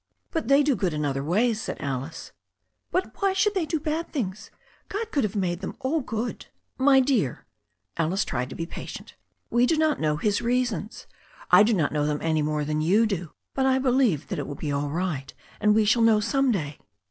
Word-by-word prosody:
'But 325 - -2
they 275 +1 +5
do 285 -2 +2
good 180 -6 -1
in 150 0 -1
other 135 -1 -1
ways," 215 +8 +1
said - - -5
Alice. 135 +2 -5 0.6
'But 365 +2 -2
why 390 -1 +3
should 410 +2 +2
they 365 -5 -1
do 325 - -1
any 305 0 +1
bad 335 +1 -5
things? 215 - -4 0.4
Gcd 440 +2 -4
could 280 - +1
have 210 -1 -2
made 175 -3 -1
them 195 - -5
all 295 +4 0
good." 235 -1 -4 0.3
"My 270 0 +6
dear" 250 - 0 0.3
— - - -46
^Alice 170 +4 +1
tried 125 0 -3
to 130 - -8
be 165 - -3
patient - - -8 0.2
— - - -48
^"we 240 +1 +4
do 325 - +2
not 310 -1 +2
know 150 -1 +1
His 205 +5 0
reasons. 235 -4 -1 0.5
I - - +9
do 215 +1 +4
not 160 -6 +1
know 150 -1 0
them 150 -1 0
any 160 -1 0
more 150 0 -1
than 155 +1 -1
you 200 +8 +4
do. 180 -6 -3 0.2
But 265 0 +1
I 260 0 +3
believe 255 - +2
that - - -3
it - - -4
will 145 - -5
be 150 +1 -4
all 145 +1 -1
right, 160 -4 -3 0.3
and 210 0 +4
we 220 -1 +4
shall 230 +3 +3
know 225 -2 +5
some 270 +4 +1
day." 150 -9 -3
210 Hz, 225 wpm, -25 LUFS, -, 0.6 s, I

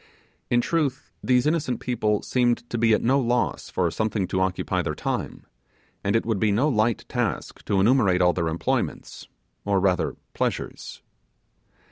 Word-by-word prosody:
In 120 0 +3
truth 145 -2 -1
these 125 -1 +3
innocent 150 -5 0
people 105 -4 0
seemed 120 -1 +1
to 120 - -1
be 115 0 +3
at - - -3
no 135 +4 +3
loss 120 -1 0
for 85 -3 0
something 110 -1 -1
to 95 - 0
occupy 95 -1 0
their - - -3
time; - - -4 0.6
and 100 +2 +1
it 115 - +1
would 110 -3 0
be 105 0 +2
no 115 +9 +2
light 110 -5 +1
task - - -3
to 100 - +1
enumerate 100 -4 +4
all 90 -1 +4
their 85 -2 -1
employments, 80 +1 -2 0.4
or 100 -1 +1
rather 95 -1 +1 0.2
pleasures. - - -4
110 Hz, 160 wpm, -24 LUFS, 95-125 Hz, 0.6 s, enumerate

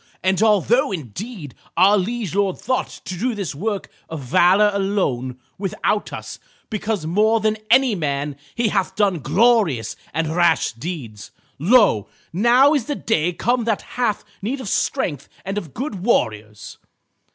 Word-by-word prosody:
And 190 +1 +2
although 225 +6 +3
indeed 170 - -6 0.2
our 200 +3 +6
liege 210 -1 -2
lord 195 -2 +1
thought 255 +1 -1 0.2
to 185 - -5
do 245 +2 0
this 195 -6 -4
work 200 +6 -3 0.2
of 160 -3 -5
valor 185 +10 +4
alone, 185 -11 -1 0.2
without 205 +1 -1
us, - - -7 0.3
because 210 -4 -2
more 215 +7 +2
than 215 0 0
any 255 0 +5
man 145 -4 -2 0.2
he 235 -2 +1
hath 190 -2 -1
done 195 -4 +1
glorious 200 - +2 0.2
and 160 0 -2
rash 170 -3 +3
deeds, 115 - -7 0.3
lo! 190 - +4 0.3
now 245 - +5
is 280 -7 0
the 290 - -2
day 175 - 0
come 240 +6 0
that 225 -3 0
hath 235 -5 -1 0.2
need 245 +8 -3
of 245 -6 -5
strength 150 - -1 0.2
and 195 +1 -3
of 165 -8 -11
good 225 -8 -4
warriors. 105 - -1
195 Hz, 150 wpm, -21 LUFS, 160-225 Hz, 0.3 s, our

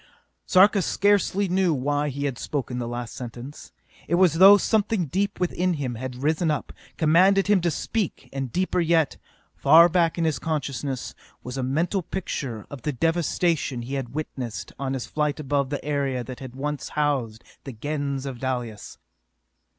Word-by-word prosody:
Sarka 195 +2 +5
scarcely 200 +1 +2
knew 180 -3 +2
why 145 +2 0
he 140 +1 -3
had 135 -4 -3
spoken 130 -4 -3
the 120 - -3
last 120 -1 -5
sentence. 125 +3 -9 0.4
It 170 - +2
was 180 -3 +4
as 165 - -3
though 195 +2 +10
something 210 -3 +1
deep 200 +7 -2
within 180 0 0
him 135 -5 -3
had 125 +2 -6
risen 160 +2 +1
up, 150 - -2 0.2
commanded 185 +5 +4
him 205 -3 +3
to 170 - +1
speak, 205 +4 -3
and 135 -3 -3
deeper 185 0 0
yet, 165 -3 +2 0.4
far 160 +4 +7
back 170 -1 +1
in 165 - +1
his 155 -5 0
consciousness, 140 -4 -3 0.3
was 125 - -6
a 135 - -2
mental 165 +9 0
picture 140 - -5
of 140 -3 -8
the 150 - -1
devastation 165 -2 0
he 130 +4 -6
had 135 -2 -4
witnessed 125 -8 -5
on 135 -1 -2
his 130 - -4
flight 150 0 -1
above 140 -2 0
the 145 0 -4
area 140 -4 -1
that 125 +1 -8
had 130 -2 -9
once 145 +2 -4
housed 130 -7 0 0.2
the 135 - -7
Gens 140 +2 -3
of 130 -3 -6
Dalis. 125 -5 -4
145 Hz, 175 wpm, -25 LUFS, 130-170 Hz, 0.4 s, though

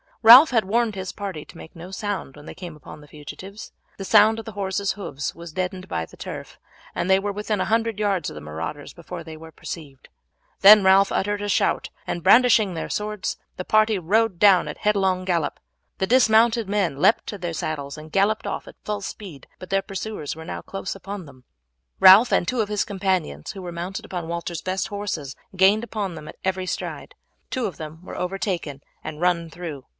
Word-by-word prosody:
Ralph 250 +8 +10
had 225 -5 +2
warned 225 +2 +1
his 190 -1 -5
party 195 -7 -6
to - - -15
make 160 - -12
no 170 +2 -9
sound 195 -7 -4
when 145 0 -13
they - - -8
came 175 -4 -9
upon 150 0 -12
the 150 - -15
fugitives. 155 +8 -10 0.3
The 195 - -6
sound 215 +2 +5
of 225 - -7
the 220 - -7
horses' 200 0 -2
hoofs 145 -9 -5
was 170 -1 -10
deadened 185 +1 -3
by 80 -1 -3
the - - -18
turf, - - -8 0.3
and 180 - -2
they 190 - +6
were 205 +1 -2
within 210 0 -2
a - - 0
hundred 225 -1 0
yards 195 -7 0
of - - -10
the 75 - -8
marauders 80 - -6
before 170 0 -8
they 160 -1 -9
were 160 +1 -12
perceived; 145 -5 -9 0.5
then 205 +1 +9
Ralph 190 +1 +5
uttered 205 +1 -1
a 205 - -3
shout - - +1 0.2
and 170 - -4
brandishing 225 -4 +5
their 165 - -5
swords 210 -1 -3 0.2
the 185 - -5
party 215 -1 +3
rode 200 +3 +1
down 195 -1 +5
at - - -6
a - - -22
headlong 190 -3 +1
gallop. 170 -4 -1 0.4
The 190 - 0
dismounted 230 -2 +4
men 190 -9 0
leaped 225 - +4
to 205 - -6
their 175 -2 -4
saddles 145 -3 -4
and 155 +1 -11
galloped 200 +4 +1
off - - -4
at - - -15
full 210 -1 -3
speed, 190 -7 -9
but 185 - -11
their 195 0 +2
pursuers 195 -6 -5
were 160 0 -10
now - - -5
close 195 0 -6
upon 195 -1 -7
them. 130 -3 -16 0.5
Ralph 195 +6 +8
and 175 - +2
two 250 +2 0
of 210 - -2
his 210 -1 0
companions, 185 - -2
who 195 - -9
were 175 - -6
mounted 175 +3 -5
upon 175 -3 -5
Walter's 170 0 -4
best 185 +1 -2
horses, 195 -10 -4 0.2
gained 195 +4 +4
upon 210 -5 -4
them 155 -2 -9
at - - -11
every 185 0 -1
stride. - - -5 0.3
Two 255 -3 -2
of 180 - -4
them 160 +2 -9
were - - -8
overtaken 180 -6 -3 0.2
and 155 -1 -7
run 170 -2 +1
through. 160 -5 -8
190 Hz, 210 wpm, -23 LUFS, 165-205 Hz, 0.5 s, Ralph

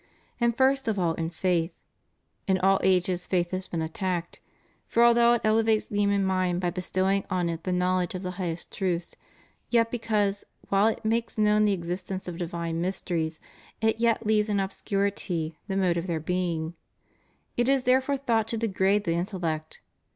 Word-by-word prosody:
And 235 -1 +1
first 270 -1 +3
of 220 -2 0
all 170 -3 +1
in 165 0 -3
faith. 170 0 0 0.8
In 190 -1 +3
all 195 +1 +3
ages 180 -1 +1
faith 175 -2 0
has 185 0 -3
been 165 -2 -2
attacked; 175 +1 -3 0.5
for 235 - +3
although 235 0 +6
it 240 - +1
elevates 220 0 +3
the 205 - -3
human 200 -1 +2
mind 185 -2 +1
by 175 -1 0
bestowing 190 +2 0
on 180 -3 0
it 165 -1 -5
the 185 - -1
knowledge 180 0 +1
of 185 - -5
the 180 - -3
highest 165 -2 -4
truths, 180 -3 -2 0.5
yet 230 -1 +3
because, 210 -4 0 0.3
while 200 +2 +4
it 225 - -2
makes 230 +1 0
known 210 0 +4
the 205 - +3
existence 185 +1 -4
of 175 0 -6
divine 170 -1 -3
mysteries, 170 -3 -2 0.4
it 220 0 +1
yet 230 -1 +2
leaves 215 0 +2
in 205 -1 +1
obscurity 190 -4 -2
the 195 -2 -2
mode 180 -3 +2
of 170 +2 -3
their 165 -2 -1
being, 170 -1 -2 0.8
it 240 +2 +1
is 270 -2 +3
therefore 260 +2 +2
thought 230 -5 +1
to 230 - -2
degrade 200 -2 +1
the 170 -4 0
intellect. 170 -4 -3
190 Hz, 175 wpm, -27 LUFS, 175-215 Hz, 0.8 s, although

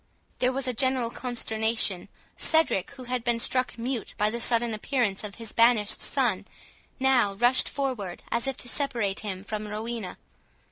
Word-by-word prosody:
There 250 0 +2
was 265 0 -3
a 255 - 0
general 255 -1 +2
consternation. 220 -6 0 0.3
Cedric, 320 - +3
who 260 -2 -11
had 250 -1 -3
been 240 -1 +1
struck 255 +1 0
mute 240 0 -3
by 210 +1 +2
the 235 - -4
sudden 235 -1 +2
appearance 215 -3 -1
of 205 -1 -6
his 230 -2 -7
banished 230 -3 +3
son, 215 -8 0 0.5
now 260 -6 +3
rushed 245 +5 +4
forward, 250 -11 -3
as 235 +3 0
if 270 - -2
to - - -5
separate 235 -7 -1
him 190 -3 -5
from 215 +1 -5
Rowena. 215 -1 -5
235 Hz, 160 wpm, -27 LUFS, 210-255 Hz, 0.5 s, rushed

